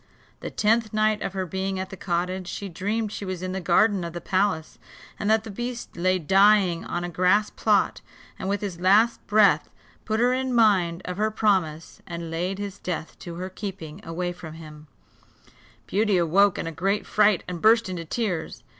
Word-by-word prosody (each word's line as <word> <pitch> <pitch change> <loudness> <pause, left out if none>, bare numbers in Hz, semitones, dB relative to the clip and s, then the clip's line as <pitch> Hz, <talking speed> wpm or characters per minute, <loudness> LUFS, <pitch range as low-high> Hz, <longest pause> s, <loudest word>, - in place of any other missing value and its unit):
The - - -5
tenth 220 +1 +1
night 215 0 +2
of 195 - -3
her 190 -1 -2
being 190 +2 -3
at 190 - -5
the - - -6
cottage 180 0 -2
she 200 - -5
dreamed 205 +5 -2
she 210 - -6
was 185 -2 -5
in 185 - -3
the 190 0 -3
garden 190 +2 +3
of 170 -1 -5
the 175 - -4
palace, 185 -4 -1 0.4
and 210 - -1
that 220 0 +3
the 220 - -8
beast 240 +3 -6
lay 185 +2 +2
dying 190 0 +4
on 175 0 -3
a - - -2
grass 180 +5 +2
plot, - - +1 0.4
and, 190 - -3
with 200 0 -1
his 190 -5 -5
last 210 +6 +4
breath, 200 -7 +4 0.3
put 220 0 -1
her 245 +1 +3
in 260 -1 -1
mind 190 -7 +3
of 180 0 -5
her 215 +1 +1
promise, 185 -8 0
and 170 -1 -6
laid 180 +4 -2
his 200 -1 -6
death 170 -3 -5
to 170 -1 -8
her 180 +2 -4
keeping 190 -3 -7
away 175 +2 -3
from 160 -3 -10
him; 155 -1 -12 1.0
Beauty 205 -1 +1
awoke 180 +4 +3
in - - -3
a 165 - -3
great 195 +6 -1
fright, 210 -3 +3
and 175 -2 -5
burst 225 0 +5
into 180 -2 -4
tears. 175 -3 -3
190 Hz, 195 wpm, -25 LUFS, 175-210 Hz, 1.0 s, burst